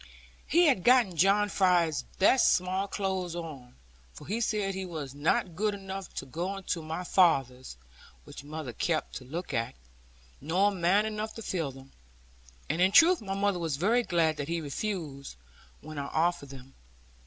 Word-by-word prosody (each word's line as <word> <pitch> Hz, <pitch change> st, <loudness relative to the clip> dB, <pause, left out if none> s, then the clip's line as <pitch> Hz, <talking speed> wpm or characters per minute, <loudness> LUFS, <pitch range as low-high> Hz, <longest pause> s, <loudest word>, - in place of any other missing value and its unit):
He 345 Hz, +4 st, +4 dB
had 260 Hz, -, +3 dB
gotten 240 Hz, -8 st, +4 dB
John 195 Hz, +5 st, +3 dB
Fry's 180 Hz, -6 st, +2 dB, 0.2 s
best 250 Hz, +7 st, +5 dB
small 185 Hz, +2 st, -1 dB
clothes 190 Hz, -4 st, -3 dB
on, 150 Hz, -8 st, -8 dB, 0.4 s
for -, -, -13 dB
he 220 Hz, +4 st, -2 dB
said 210 Hz, -3 st, 0 dB
he 190 Hz, 0 st, -4 dB
was 155 Hz, -7 st, -6 dB
not 160 Hz, +4 st, 0 dB
good 210 Hz, +2 st, 0 dB
enough 195 Hz, -1 st, -7 dB
to -, -, -4 dB
go 175 Hz, +8 st, -4 dB
into 180 Hz, -3 st, -3 dB
my 160 Hz, +3 st, -5 dB
father's 135 Hz, -, +1 dB, 0.5 s
(which -, -, -11 dB
mother 150 Hz, -4 st, -6 dB
kept 160 Hz, +4 st, -1 dB
to -, -, -10 dB
look 165 Hz, +8 st, -6 dB
at), 115 Hz, -, -2 dB, 0.7 s
nor 180 Hz, +8 st, +2 dB
man 190 Hz, +3 st, +2 dB
enough 215 Hz, 0 st, -4 dB
to 225 Hz, -, -7 dB
fill 165 Hz, -9 st, -2 dB
them. 135 Hz, +1 st, -14 dB, 0.8 s
And 160 Hz, +4 st, -1 dB
in 185 Hz, +1 st, +4 dB
truth 340 Hz, -, +6 dB
my 195 Hz, -2 st, -4 dB
mother 200 Hz, -2 st, 0 dB
was 160 Hz, -5 st, -2 dB
very 220 Hz, -, +2 dB
glad 165 Hz, -7 st, +1 dB
that 145 Hz, -, -4 dB
he 170 Hz, +1 st, -1 dB
refused, 150 Hz, -, -5 dB, 0.5 s
when 155 Hz, -1 st, -7 dB
I 140 Hz, -, -4 dB
offered 165 Hz, -2 st, 0 dB
them. 135 Hz, 0 st, -12 dB
175 Hz, 170 wpm, -29 LUFS, 155-195 Hz, 0.8 s, truth